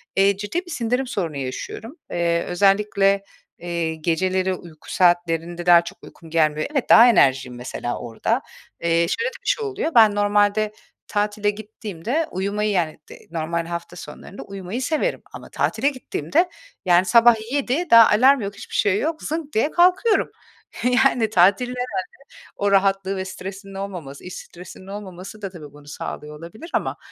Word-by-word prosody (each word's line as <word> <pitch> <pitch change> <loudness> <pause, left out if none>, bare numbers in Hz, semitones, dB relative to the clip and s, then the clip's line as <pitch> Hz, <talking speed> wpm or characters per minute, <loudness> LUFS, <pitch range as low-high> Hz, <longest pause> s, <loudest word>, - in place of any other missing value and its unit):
eee, 195 0 +3
ciddi 330 - -3
bir 350 - -10
sindirim 250 +1 -1
sorunu 170 - -3
yaşıyorum. 140 - -6 0.2
Eee, 170 -1 0
özellikle, 195 +1 +2 0.4
eee, 170 -2 -3
geceleri 185 +4 0
uyku 165 -3 -11
saatlerinde 175 -1 +1
daha 175 -1 +7
çok 170 - -11
uykum 165 -2 -14
gelmiyor. 155 -2 +1
Evet, 275 -5 -1
daha 235 +2 +9
enerjiğim 135 - +3
mesela 120 0 -5
orada. 115 -2 -2 0.4
Eee, 170 - -1 0.2
şöyle 465 - -1
de 480 - -16
bir - - -12
şey 470 -3 0
oluyor. 395 -5 -2
Ben 215 -3 +6
normalde 205 +1 +2 0.4
tatile 210 0 0
gittiğimde 215 - -4
uyumayı 200 +3 -1
yani 170 -6 -1
dı - - -10 0.2
normal 165 0 -2
hafta 170 +1 -6
sonlarında 195 - -10
uyumayı 195 +5 -6
severim 315 - -1
ama - - -10
tatile 280 - 0
gittiğimde 255 - -1 0.4
yani 175 +1 +4
sabah 235 +1 +6 0.2
7, 285 +4 -1
daha 230 -1 +9
alarm 260 +5 +5
yok, 200 0 -5
hiçbir - - -9
şey 200 0 +2
yok, 315 +1 -3
zınk 310 -1 -4
diye 255 +8 +1
kalkıyorum. 370 +5 +3 0.5
Yani, 250 -3 +3
tatilin 200 +5 +4
herhâlde 245 -6 -3 0.6
o 200 0 0
rahatlığı 195 0 +2
ve 190 - -3
stresinin 195 +1 -8
olmaması, 180 -8 -7
iş 180 - -8
stresinin 180 +2 -11
olmaması 195 +1 -9
da 195 - -4
tabii 155 -6 -11
bunu 145 0 -16
sağlıyor 150 +1 -7
olabilir. 215 - -11
Ama, - - -1
195 Hz, 155 wpm, -22 LUFS, 170-235 Hz, 0.6 s, daha